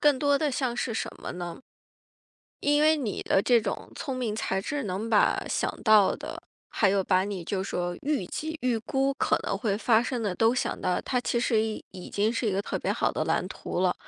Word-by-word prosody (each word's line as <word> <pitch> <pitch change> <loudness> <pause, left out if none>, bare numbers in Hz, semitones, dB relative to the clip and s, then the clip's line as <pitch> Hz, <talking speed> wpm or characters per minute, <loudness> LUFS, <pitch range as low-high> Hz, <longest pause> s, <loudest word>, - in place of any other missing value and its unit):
更 290 -3 +4
多 285 0 +3
的 300 0 0
像 255 -2 -1
是 235 - -1
什 225 - -2
么 - - -5
呢？ 175 -1 -6 1.0
因 290 +1 +3
为 310 +1 +5
你 240 -9 -3
的 - - +3
这 235 +3 +4
种 205 -2 -4
聪 270 -3 -4
明 240 -4 -2
才 190 -3 -1
智 285 +8 -3
能 205 +2 -3
把 215 -2 +3
想 - - 0
到 215 -3 +6
的， - - -7 0.3
还 205 - +2
有 195 0 +2
把 185 0 +3
你 195 -3 -4
就 190 +2 -2
说 175 -2 -2
预 280 -10 0
计 315 - -4
预 250 -2 +2
估 270 +4 0
可 - - +1
能 - - -1
会 210 -4 -1
发 225 0 +4
生 245 0 -2
的 200 -4 -1
都 225 +4 +3
想 255 - -2
到， 180 -1 0
它 250 - 0
其 240 - 0
实 230 -2 +2
已 220 -1 -4
已 180 - -9
经 210 +2 +1
是 230 0 -1
一 - - +2
个 195 0 0
特 - - -3
别 - - -1
好 - - 0
的 - - -1
蓝 - - 0
图 - - -4
了。 - - +2
225 Hz, 245 characters per minute, -27 LUFS, 195-260 Hz, 1.0 s, 到